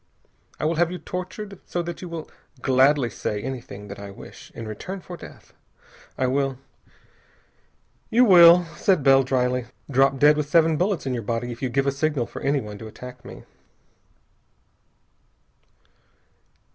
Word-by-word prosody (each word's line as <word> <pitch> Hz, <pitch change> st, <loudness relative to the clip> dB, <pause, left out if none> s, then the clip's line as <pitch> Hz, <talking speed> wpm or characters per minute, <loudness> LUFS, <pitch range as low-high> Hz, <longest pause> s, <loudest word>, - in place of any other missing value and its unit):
I -, -, -2 dB
will 160 Hz, +1 st, 0 dB
have 175 Hz, 0 st, +2 dB
you 180 Hz, -, -4 dB
tortured 185 Hz, +2 st, -7 dB
so 175 Hz, -, -2 dB
that 170 Hz, -1 st, -6 dB
you 180 Hz, -, -7 dB
will 165 Hz, -2 st, -6 dB, 0.3 s
gladly 135 Hz, +1 st, +3 dB
say 105 Hz, -1 st, -4 dB
anything 115 Hz, -4 st, -7 dB
that 100 Hz, 0 st, -9 dB
I 100 Hz, 0 st, -8 dB
wish, 100 Hz, -, -13 dB
in 115 Hz, -, -7 dB
return 185 Hz, -, -6 dB
for 180 Hz, 0 st, -9 dB
death. -, -, -14 dB, 0.6 s
I 130 Hz, -, +1 dB
will 135 Hz, 0 st, 0 dB, 0.8 s
" -, -, -40 dB
"You 245 Hz, +3 st, +5 dB
will," 175 Hz, -3 st, +8 dB
said 180 Hz, -2 st, +2 dB
Bell 135 Hz, 0 st, +6 dB
dryly, 125 Hz, -2 st, 0 dB, 0.2 s
"drop 135 Hz, +1 st, +3 dB
dead 150 Hz, +2 st, +5 dB
with 150 Hz, -1 st, -2 dB
seven 165 Hz, 0 st, +4 dB
bullets 180 Hz, 0 st, 0 dB
in 130 Hz, -, -1 dB
your 120 Hz, -, -2 dB
body 115 Hz, +2 st, -3 dB
if 120 Hz, -, -9 dB
you 130 Hz, -, -1 dB
give 135 Hz, +3 st, 0 dB
a 140 Hz, -, +2 dB
signal 140 Hz, -2 st, -1 dB
for -, -, -9 dB
anyone 130 Hz, -8 st, -2 dB
to 110 Hz, -, -8 dB
attack 125 Hz, +3 st, -11 dB
me." -, -, -11 dB
135 Hz, 160 wpm, -24 LUFS, 125-170 Hz, 0.8 s, will